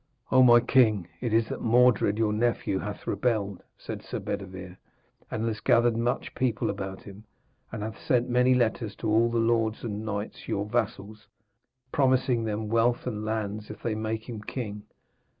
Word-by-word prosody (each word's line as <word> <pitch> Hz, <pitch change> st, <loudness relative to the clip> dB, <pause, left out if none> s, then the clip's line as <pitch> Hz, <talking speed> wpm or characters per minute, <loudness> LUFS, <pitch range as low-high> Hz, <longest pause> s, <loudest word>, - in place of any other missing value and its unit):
'O 130 Hz, -, +6 dB
my 120 Hz, -2 st, +8 dB
king, 115 Hz, -7 st, +3 dB
it 120 Hz, -, -2 dB
is 110 Hz, 0 st, +3 dB
that -, -, -5 dB
Mordred 115 Hz, -3 st, +4 dB
your 110 Hz, -2 st, +1 dB
nephew 110 Hz, -3 st, 0 dB
hath 105 Hz, 0 st, -6 dB
rebelled,' 105 Hz, -6 st, -1 dB, 0.2 s
said -, -, -7 dB
Sir -, -, -5 dB
Bedevere, 95 Hz, -1 st, -6 dB, 0.5 s
'and 110 Hz, -, -2 dB
has 110 Hz, -2 st, -2 dB
gathered 120 Hz, -1 st, +3 dB
much 120 Hz, +2 st, -1 dB
people 125 Hz, -4 st, 0 dB
about 95 Hz, -1 st, -6 dB
him, 100 Hz, +1 st, -12 dB, 0.5 s
and 110 Hz, -2 st, -5 dB
hath 110 Hz, 0 st, -6 dB
sent 125 Hz, -1 st, +1 dB
many 125 Hz, +1 st, +3 dB
letters 115 Hz, -3 st, 0 dB
to 115 Hz, -, -4 dB
all 115 Hz, +2 st, +3 dB
the 115 Hz, -, -1 dB
lords 115 Hz, -1 st, +1 dB
and 105 Hz, -2 st, -4 dB
knights 105 Hz, -1 st, -5 dB
your 100 Hz, -, -1 dB
vassals, 105 Hz, 0 st, -3 dB, 0.6 s
promising 130 Hz, -3 st, +2 dB
them 110 Hz, 0 st, -2 dB
wealth 115 Hz, +2 st, +2 dB
and 110 Hz, -4 st, -3 dB
lands 110 Hz, -1 st, -3 dB
if 105 Hz, -, -10 dB
they 115 Hz, -, 0 dB
make 110 Hz, +1 st, -3 dB
him 115 Hz, -4 st, -6 dB
king. 105 Hz, -2 st, -5 dB
110 Hz, 170 wpm, -27 LUFS, 105-120 Hz, 0.6 s, my